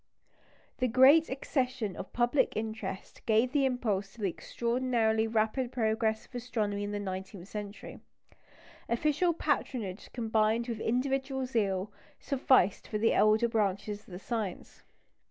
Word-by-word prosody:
This 255 -1 +1
great 270 +7 +6
accession 255 - -2
of - - -7
public 240 +2 +1
interest 220 -3 -5
gave 225 +3 +3
the 280 -1 +2
impulse 210 -7 -1
to 235 - -13
the 195 - +1
extraordinarily 235 0 0
rapid 225 +3 0
progress 220 -2 0
of - - -27
astronomy 220 -5 -2
in 205 - -3
the 205 - -2
nineteenth 190 -1 -6
century. 210 -1 -7 0.9
Official 300 +8 +2
patronage 250 - -2
combined 225 0 +1
with 230 -3 -3
individual 265 +3 0
zeal 205 -5 -1 0.3
sufficed 260 -8 +2
for 215 - -2
the 225 +2 +3
elder 215 +2 +4
branches 205 -2 -1
of - - -25
the 180 - -8
science. 210 -2 -5
225 Hz, 135 wpm, -30 LUFS, 205-255 Hz, 0.9 s, great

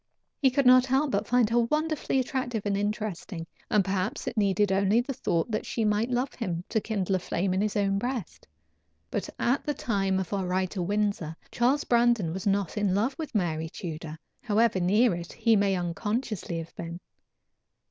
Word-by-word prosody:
He 270 - +6
could 270 +1 +1
not 255 +1 +7
help 270 +2 +2
but - - 0
find 245 -2 +4
her 240 - +4
wonderfully 305 +4 0
attractive 245 -5 -2
and 200 -1 +1
interesting, 205 -4 -3 0.2
and 205 -3 +3
perhaps 190 -1 -2
it - - -3
needed 200 -1 +2
only 200 +3 +3
the 260 +3 -2
thought 170 -4 -1
that 215 - -1
she 225 - -2
might 210 +3 +1
love 250 +2 -1
him, 175 -8 -3
to 220 - +1
kindle 195 -4 -1
a - - -4
flame 180 +1 -1
in 190 - +1
his 210 0 -1
own 195 -1 +1
breast. 245 -3 -4 0.6
But - - -2
at 250 +4 +1
the 295 - -2
time 195 -6 0
of 190 0 -3
our 190 -2 -1
ride 185 0 0
to 190 - -3
Windsor, 200 -4 -1 0.2
Charles 260 +5 +2
Brandon 235 -8 +2
was 190 +2 -4
not 200 -1 0
in 200 -3 +1
love 235 +7 +1
with 310 -7 -5
Mary 160 -5 0
Tudor, 160 -2 -6 0.2
however 220 -2 +2
near 205 +6 +3
it 170 0 -6
he 225 -1 +3
may 200 -1 +2
unconsciously 195 +1 -2
have 165 0 -7
been. 170 0 -6
205 Hz, 190 wpm, -27 LUFS, 185-240 Hz, 0.6 s, not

